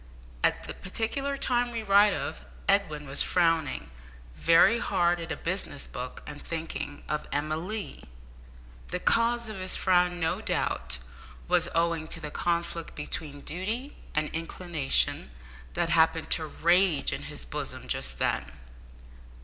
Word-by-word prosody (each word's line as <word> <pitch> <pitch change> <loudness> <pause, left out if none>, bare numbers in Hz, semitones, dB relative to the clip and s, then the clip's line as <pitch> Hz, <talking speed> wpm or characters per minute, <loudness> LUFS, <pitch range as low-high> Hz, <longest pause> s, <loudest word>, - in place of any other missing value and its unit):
At - - +2
the - - -5
particular 275 +8 -2
time 245 -2 +1
we 230 -1 -3
write 200 0 +6
of, - - -5 0.2
Edwin 155 -8 +2
was 135 - +2
frowning 165 - +1 0.4
very 170 +8 +5
hard 175 -3 +2
at 165 -1 -5
a - - 0
business 175 -5 -3
book 125 0 -7
and 145 0 -8
thinking 160 -3 -5
of 150 0 -2
Emma 155 +2 0
Lee. 195 +6 -5 0.8
The - - -2
cause 235 0 +3
of 215 -3 -6
his 185 0 -1
frown, 180 -1 +3
no 165 -1 0
doubt, - - -1 0.5
was - - +3
owing 165 -1 +1
to 165 - -3
the 150 -2 -6
conflict 170 0 -2
between 145 -1 -5
duty 220 - -3 0.2
and 155 0 +2
inclination 165 -3 +1 0.5
that 175 -1 +1
happened 160 -1 +3
to 160 -2 +2
rage 170 0 +3
in - - -5
his 60 - -6
bosom 60 - -5
just - - -2
then. 70 +1 -1
170 Hz, 140 wpm, -28 LUFS, 155-195 Hz, 0.8 s, write